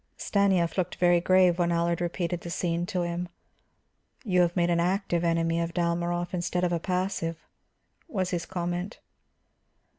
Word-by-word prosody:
Stanief 190 -3 +1
looked 180 - -1
very 175 -1 +3
grave 185 -1 +4
when 175 -1 +2
Allard 170 0 0
repeated 175 0 -2
the 170 - -7
scene 170 0 -1
to 180 -1 -1
him. 175 +1 -3 0.9
"You 185 -6 +2
have 175 0 +1
made 175 -1 +2
an 170 - +2
active 175 -1 0
enemy 165 0 +1
of 170 0 -3
Dalmorov 175 0 -1
instead 175 0 -1
of 175 -1 +1
a 170 - 0
passive," 180 -2 -2 0.6
was 190 - -2
his 175 -2 -2
comment. 175 +1 -3
175 Hz, 155 wpm, -27 LUFS, 170-180 Hz, 0.9 s, grave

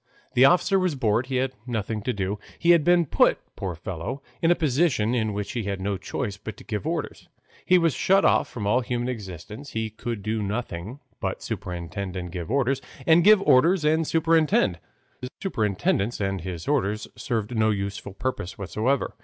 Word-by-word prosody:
The 130 - +6
officer 180 +5 +4
was 180 -5 0
bored, 120 -1 +1
he 130 - -3
had 130 +1 0
nothing 110 -2 -2
to 125 - -1
do. 100 -1 -2 0.2
He 170 - +4
had 170 -3 +5
been 175 +1 +4
put, - - +3 0.2
poor 95 -3 -4
fellow, 85 - -5 0.2
in 165 - +3
a 175 - +5
position 140 -7 +1
in 110 -3 0
which 105 0 -4
he 115 -4 -3
had 100 -1 -2
no 100 +1 -1
choice 100 +2 -4
but 110 +1 -8
to - - -12
give 105 -6 -4
orders. - - -4 0.4
He 185 - +6
was 165 -4 +2
shut 195 +8 +3
off - - +3
from 110 -4 -5
all 120 +5 +3
human 120 0 -2
existence; 105 - -7
he 110 -1 -2
could 110 -1 -5
do 110 0 -1
nothing 105 +3 -4 0.2
but - - -3
superintend 90 +2 -5
and 90 -1 -5
give 85 +1 -5
orders, 135 +1 +1 0.2
and 165 +1 +6
give 210 0 +7
orders 165 +5 +4
and 160 +1 +2
superintend, 160 - +3 0.4
though 125 - -5
his - - -10
superintendence 105 - 0
and 95 -2 -1
his 85 -2 -6
orders 110 -7 0
served 110 +1 -3
no 110 0 +3
useful 100 -1 -3
purpose 115 -8 -3
whatever. 110 +8 -1
115 Hz, 190 wpm, -25 LUFS, 100-140 Hz, 0.4 s, give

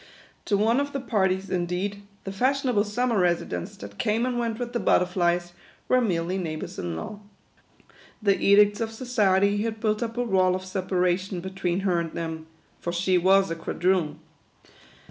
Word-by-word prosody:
To 205 - +2
one 225 +5 +3
of 285 0 -2
the 275 - -1
parties, 190 -6 0
indeed, 185 +3 -2 0.2
the 195 - -5
fashionable 250 0 +1
summer 235 +1 0
residents, 170 - -1
that 100 0 -10
came 220 +3 +1
and 250 -1 -1
went 230 -2 -2
with 245 0 -5
the 240 - 0
butterflies, 175 -2 +1 0.3
were 255 - +4
merely 180 -3 -1
neigh 160 -4 -3
bours 155 - -7
in 85 -2 -3
law. 200 - -6 1.0
The 200 -3 +3
edicts 205 +2 +5
of 225 - -1
society 205 -4 +2
had 220 0 -3
built 215 0 0
up 230 0 -3
a 245 - +1
wall 185 -5 +2
of 185 0 -5
separation 185 0 -1
between 190 0 -2
her 185 -3 +1
and 165 -1 -4
them; 160 -1 -5 0.3
for 175 - -3
she 180 +1 +2
was 190 0 +4
a - - -1
quadroon. 165 -2 0
190 Hz, 170 wpm, -26 LUFS, 175-220 Hz, 1.0 s, edicts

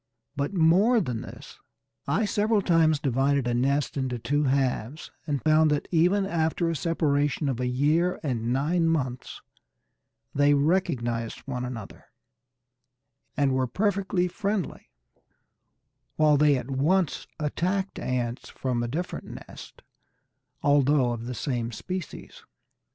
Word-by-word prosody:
But 140 0 -1
more 195 +7 +4
than 125 - -3
this, - - -11 0.5
I 210 +5 +1
several 210 0 +1
times 165 -3 +3
divided 140 0 +1
a 120 - 0
nest 140 +4 0
into 130 -2 -2
two 145 +6 0
halves, 135 0 -1 0.2
and 145 -3 -2
found 155 0 +4
that 150 -1 0
even 180 +4 +3
after 165 -1 0
a - - -2
separation 145 -2 0
of 130 -3 -1
a 125 - -1
year 150 +8 +1
and 120 -5 -1
nine 165 +6 +1
months 130 -6 -3 0.9
they 145 +1 +4
recognized 125 -8 0
one 125 -2 -5
another, 120 -5 -7 1.3
and 140 -2 +2
were 130 -1 +1
perfectly 190 - 0
friendly; 200 +1 -3 1.3
while 155 -1 +4
they 145 -1 +4
at 130 +2 -6
once 160 +6 +1
attacked 185 +6 -1
ants 125 -1 -3
from 125 -3 -2
a 120 - -2
different 165 +9 -5
nest, - - -12 0.8
although 145 -3 +3
of 120 0 -5
the 125 - -4
same 120 -4 -2
species. 180 +9 -7
145 Hz, 130 wpm, -26 LUFS, 125-170 Hz, 1.3 s, more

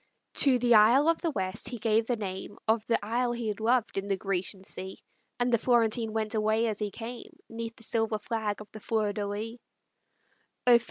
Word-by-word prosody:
To 270 -3 +6
the 240 0 +3
isle 235 +7 +6
of 330 - +1
the 335 - 0
West 195 -2 -2
he 245 - -5
gave 225 0 +1
the 245 - +1
name 195 -1 -5
Of 220 0 +2
the 230 - +3
isle 240 +2 0
he 235 -2 -3
had 210 - -3
loved 230 -2 +1
in 195 - -6
the 195 -1 0
Grecian 190 0 -3
sea; 190 0 -7 0.4
And 245 0 +1
the 235 - +4
Florentine 230 -2 +2
went 220 0 -1
away 220 +1 +2
as 215 -3 -2
he 210 -1 -1
came, 235 +4 -8
'Neath 230 0 -6
the - - -14
silver 225 -1 0
flag 210 -1 -3
of 210 - -12
the 215 - -9
Fleur 215 -1 0
de 205 0 -2
lis. 220 +4 -5
220 Hz, 205 wpm, -29 LUFS, 210-235 Hz, 0.4 s, To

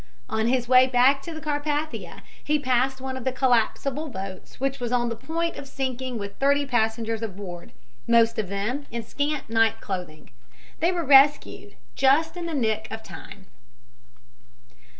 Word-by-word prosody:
On 220 -2 0
his 245 -1 +1
way 255 +1 +6
back 260 +2 +4
to 335 - -7
the 315 - -6
Carpathia 300 0 -3 0.2
he 300 +1 +1
passed 260 -1 +1
one 265 0 -4
of 260 - -6
the 260 - 0
collapsible 260 +4 0
boats 190 -5 -8
which 275 +1 -1
was 240 -1 -3
on 240 -1 +1
the 230 - -3
point 335 +6 -3
of 275 - -8
sinking 260 -2 -3
with 200 -1 -7
thirty 280 +1 +2
passengers 225 -2 0
aboard, 190 -5 -7 0.4
most 230 0 +4
of 205 -4 -2
them 215 +9 -3
in 235 0 -5
scant 290 +5 -2
night 225 0 +2
clothing. 180 -8 -6 0.5
They 335 +3 +2
were 345 -3 -2
rescued 280 +1 +4 0.2
just 290 +5 +3
in 350 -1 -5
the 325 - -3
nick 220 -4 0
of 220 0 -7
time. 195 -3 -11
255 Hz, 165 wpm, -25 LUFS, 225-285 Hz, 0.5 s, way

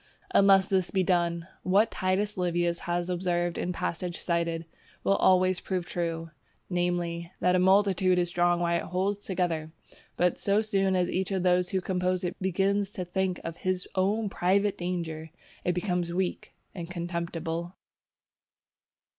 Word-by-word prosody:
Unless 195 -1 +5
this 190 -3 +1
be 190 -1 +1
done, 170 -1 +1
what 205 +4 +3
Titus 195 +3 0
Livius 175 -1 0
has 175 0 0
observed 175 -1 -1
in 180 - -1
the 175 - -7
passage 175 0 -3
cited, 170 -1 -1 0.4
will 195 - +3
always 185 0 +4
prove 185 -2 -3
true, 165 -2 -3 0.4
namely, 175 -1 -1
that 180 0 +3
a - - +3
multitude 190 -1 +4
is 175 -1 +2
strong 175 0 +2
while 170 0 +1
it - - -5
holds 195 +3 -1
together, 175 -5 -2 0.5
but 180 0 +2
so 200 +1 +2
soon 195 -3 +1
as 180 -1 +2
each 190 0 -1
of 190 -2 -1
those 180 0 +3
who 190 - 0
compose 185 0 -1
it 175 - -2
begins 195 +2 +1
to 180 - -4
think 185 0 -1
of 165 0 -5
his 185 +1 -2
own 205 +4 +1
private 200 +2 +1
danger, 165 -3 -4 0.3
it 180 - +1
becomes 180 -1 -1
weak 180 +1 -3 0.2
and 170 -3 -6
contemptible. 170 0 -4
180 Hz, 155 wpm, -28 LUFS, 175-190 Hz, 0.5 s, Unless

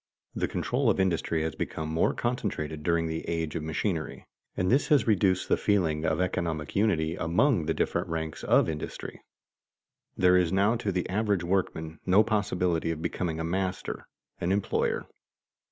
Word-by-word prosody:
_ - - -67 0.4
The - - +2
control 125 0 0
of 100 - +1
industry 85 -3 +1
has 80 - -2
become 80 - -4
more 80 +1 +1
concentrated 90 -11 -2
during 85 +1 +1
the 80 0 -3
age 80 -2 -2
of - - -2
machinery, 80 +2 -3 0.3
and 90 +2 +1
this 135 +3 +3
has 140 -8 +4
reduced 95 -4 +2
the - - +3
feeling 85 -7 +1
of 80 - +1
economic 85 -4 -2
unity 85 -6 +2
among 85 - +2
the 80 - +2
different - - 0
ranks 80 -1 -4
of - - +4
industry. 75 -2 -6 1.0
There 90 0 +5
is 90 -2 +2
now 100 +4 +3
to 105 -3 -2
the 90 -1 -1
average 100 -1 0
workman 80 -3 -2
no 95 +4 +5
possibility 90 -6 0
of 80 0 -3
becoming 80 -3 -2
a - - -2
master, 90 +2 -3 0.3
an 85 - -1
employer. 100 0 0
90 Hz, 170 wpm, -28 LUFS, 80-100 Hz, 1.0 s, There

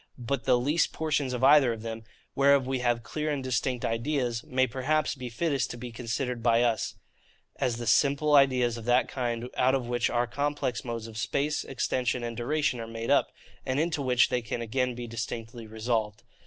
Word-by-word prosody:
But 125 +1 -3
THE 125 -2 +4
LEAST 145 +7 +1
PORTIONS 150 -4 -1
OF 125 0 -3
EITHER 135 -3 +6
OF 110 -1 -8
THEM, 115 0 -5 0.3
WHEREOF 140 0 +4
WE 130 0 -2
HAVE 120 -1 0
CLEAR 150 +7 -3
AND 145 -3 -2
DISTINCT 125 0 -1
IDEAS, 120 0 -1
may 130 0 +2
perhaps 135 +4 0
be 130 -3 -7
fittest 140 +2 -1
to - - -6
be 120 0 -7
considered 120 +1 -3
by 115 0 +3
us, 115 -2 0 0.6
as 120 - 0
the 120 - -5
simple 140 +5 +3
ideas 130 -4 +4
of 115 - -8
that 120 +1 +3
kind 120 -2 -3
out 130 +1 +3
of 125 -3 -2
which 120 -1 0
our 120 0 +1
complex 140 -1 -2
modes 115 -3 -4
of 110 -1 -7
space, 145 +5 -1
extension, 125 -2 -1
and 120 -1 -4
duration 130 +1 0
are 115 - -5
made 115 0 -4
up, - - +3 0.3
and 130 +2 -1
into 160 -2 0
which 125 -2 +3
they 125 - 0
can 115 +1 -4
again 125 +2 -1
be 120 0 -6
distinctly 115 0 -6
resolved. 110 -1 -2
125 Hz, 195 wpm, -28 LUFS, 115-135 Hz, 0.6 s, EITHER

